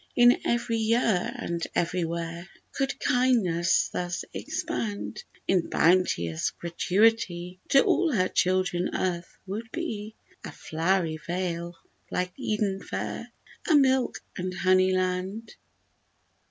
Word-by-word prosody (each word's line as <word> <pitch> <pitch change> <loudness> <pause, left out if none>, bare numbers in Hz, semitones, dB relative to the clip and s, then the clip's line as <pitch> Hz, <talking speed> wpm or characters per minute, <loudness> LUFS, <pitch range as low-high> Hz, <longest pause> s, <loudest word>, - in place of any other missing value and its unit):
If 245 0 +6
every 235 -1 0
year 220 -4 +2
and 170 0 -3
everywhere 170 0 -2 0.2
Could 270 -1 -2
kindness 220 -10 +2
thus 175 0 -3
expand 210 0 -4 0.2
In 185 -3 +2
bounteous 160 - +2
gratuity, 180 0 +1
To 275 - +6
all 345 -3 +2
her 185 -7 +2
children 185 0 +1
earth 175 -2 -2
would 220 +4 -5
be 220 -11 -4 0.3
A - - -6
flowery 165 0 0
vale 170 0 -3 0.3
like 180 0 -2
Eden 210 -6 -1
fair, - - -5 0.4
A 320 - +6
milk 265 -3 +3
and 185 0 -2
honey 185 0 +4
land. 185 +4 -2
185 Hz, 110 wpm, -27 LUFS, 175-225 Hz, 0.4 s, If